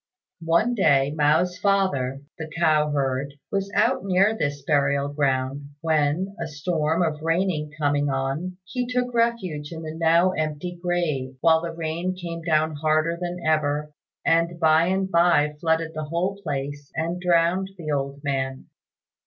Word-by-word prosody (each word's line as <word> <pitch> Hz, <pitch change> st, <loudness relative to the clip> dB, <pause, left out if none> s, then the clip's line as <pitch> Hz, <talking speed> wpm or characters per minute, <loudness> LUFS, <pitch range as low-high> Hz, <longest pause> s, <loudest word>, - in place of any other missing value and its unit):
One 190 Hz, +9 st, +3 dB
day 140 Hz, -, +3 dB
Mao's 160 Hz, +4 st, +2 dB
father, 145 Hz, -10 st, +1 dB, 0.2 s
the 160 Hz, 0 st, -5 dB
cow 155 Hz, -2 st, +3 dB
herd, 140 Hz, -1 st, -1 dB, 0.2 s
was 200 Hz, 0 st, -1 dB
out -, -, +2 dB
near 195 Hz, +3 st, +3 dB
this 145 Hz, -7 st, -2 dB
burial 140 Hz, -1 st, +1 dB
ground, 140 Hz, -1 st, -1 dB
when, 160 Hz, +4 st, 0 dB
a -, -, -2 dB
storm 160 Hz, +2 st, 0 dB
of 155 Hz, -2 st, -2 dB
rain 165 Hz, -2 st, 0 dB
coming 145 Hz, -1 st, +1 dB
on, 135 Hz, +7 st, -2 dB
he 250 Hz, +5 st, -3 dB
took 250 Hz, 0 st, -1 dB
refuge 195 Hz, -11 st, -1 dB
in 165 Hz, -1 st, -7 dB
the 155 Hz, 0 st, -5 dB
now 165 Hz, +3 st, +3 dB
empty 155 Hz, +1 st, -3 dB
grave, 155 Hz, -7 st, -1 dB
while 160 Hz, -1 st, +5 dB
the 170 Hz, 0 st, -4 dB
rain 165 Hz, +3 st, -3 dB
came 170 Hz, -2 st, -6 dB
down 155 Hz, -2 st, +1 dB
harder 155 Hz, +2 st, +1 dB
than 175 Hz, 0 st, -5 dB
ever, 150 Hz, -1 st, +1 dB, 0.3 s
and 165 Hz, +1 st, +2 dB
by 160 Hz, 0 st, +4 dB
and 190 Hz, +1 st, 0 dB
by 170 Hz, -4 st, +4 dB
flooded 160 Hz, 0 st, 0 dB
the 155 Hz, -1 st, -4 dB
whole 180 Hz, +6 st, -2 dB
place 145 Hz, -2 st, -4 dB
and 170 Hz, +2 st, -2 dB
drowned 180 Hz, +2 st, +2 dB
the 155 Hz, -3 st, -4 dB
old 140 Hz, 0 st, -3 dB
man. 135 Hz, -2 st, -2 dB
160 Hz, 155 wpm, -24 LUFS, 145-175 Hz, 0.3 s, while